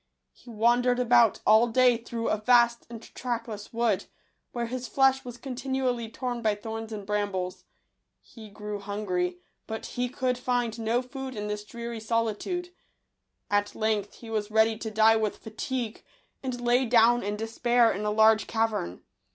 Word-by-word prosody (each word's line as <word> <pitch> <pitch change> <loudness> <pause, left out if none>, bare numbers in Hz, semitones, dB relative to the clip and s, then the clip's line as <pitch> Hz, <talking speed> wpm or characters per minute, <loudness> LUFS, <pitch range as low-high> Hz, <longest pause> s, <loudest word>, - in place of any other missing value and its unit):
He - - -18
wandered 240 +2 +2
about 240 -3 +4
all 220 +2 +6
day 250 +1 +4
through 230 0 -4
a 215 - 0
vast 235 0 +4
and 230 -1 -9
trackless 230 -4 -4
wood, 230 -4 0 0.5
where 240 -1 -2
his 250 +1 -5
flesh 265 +3 +3
was 245 -1 -8
continually 255 -2 -2
torn 245 0 -4
by 215 -2 +2
thorns 225 +1 -6
and 205 -2 -6
brambles. 200 -3 -2 0.5
He 220 -3 -13
grew 210 0 -6
hun 205 +1 -5
gry; 180 -1 0 0.3
but 220 0 -5
he 245 0 -2
could 250 0 -1
find 245 -2 -1
no 230 +3 0
food 265 0 -7
in 210 -1 -4
this 210 0 -3
dreary 235 +1 -6
solitude. 230 - -2 0.8
At 205 0 +1
length 215 -2 -1
he 230 -1 -11
was 215 -1 -2
ready 220 +1 +3
to 220 0 -5
die 220 +1 +5
with 215 -2 -1
fatigue, 230 +1 -5 0.4
and 255 -2 -4
lay 245 +1 +2
down 240 +1 +5
in 205 +1 -2
despair 230 +2 +2
in 200 - -3
a 210 - 0
large 220 +1 +4
cavern. 220 - -1
230 Hz, 165 wpm, -27 LUFS, 215-245 Hz, 0.8 s, all